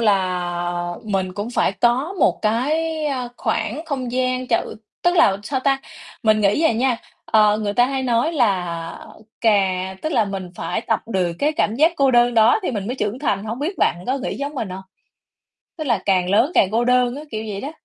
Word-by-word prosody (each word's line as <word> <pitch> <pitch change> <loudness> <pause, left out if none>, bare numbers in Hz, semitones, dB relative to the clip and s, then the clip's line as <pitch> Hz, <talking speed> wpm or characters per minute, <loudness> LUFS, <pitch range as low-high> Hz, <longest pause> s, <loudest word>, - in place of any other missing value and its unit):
là 175 -4 0
mình 190 -3 -1
cũng 205 +4 -4
phải 235 - +1
có 240 - +1
một - - +3
cái, 305 +8 0
ơ, 255 -4 -2
khoảng 235 +9 -2
không 260 -6 -4
gian 255 0 0
chợ 235 - -1 0.3
tức 350 0 +2
là, 195 - +5
sao 260 +5 -2
ta, 270 0 +2 0.4
mình 215 -2 +3
nghĩ 205 +9 +2
à 320 - +4
nha, 245 +2 +1 0.3
ờ, 210 -1 +4
người 210 -2 -2
ta 245 +4 +4
hay 270 0 -2
nói 245 +5 +1
là 180 - -1 0.3
cà 190 -4 +1
tức 310 - -2
là 225 - +3
mình 195 -3 -5
phải - - -2
tập 225 -1 0
được 185 -6 0
cái 295 +2 +1
cảm 305 -9 0
giác 315 +5 +4
cô 275 -2 +3
đơn 240 -1 +4
đó 230 - +5
thì - - -1
mình 205 -5 -4
mới 245 - -2
trưởng 210 +1 -2
thành. 205 -8 -1
Hổng 225 +3 -4
biết 315 +8 -2
bạn - - +2
có 265 +2 0
nghĩ - - -4
giống 285 +2 -4
mình 230 -7 -3
hông? 185 +1 -7 1.0
Tức 310 - -3
là 235 -5 +2
càng 185 -2 +2
lớn 225 - +3
càng 190 - +4
cô 230 +2 +2
đơn 250 0 +2
á, 290 - -7
kiểu 220 -1 -4
vậy 200 -1 -4
đó. 280 - -5
230 Hz, 210 wpm, -21 LUFS, 200-265 Hz, 1.0 s, là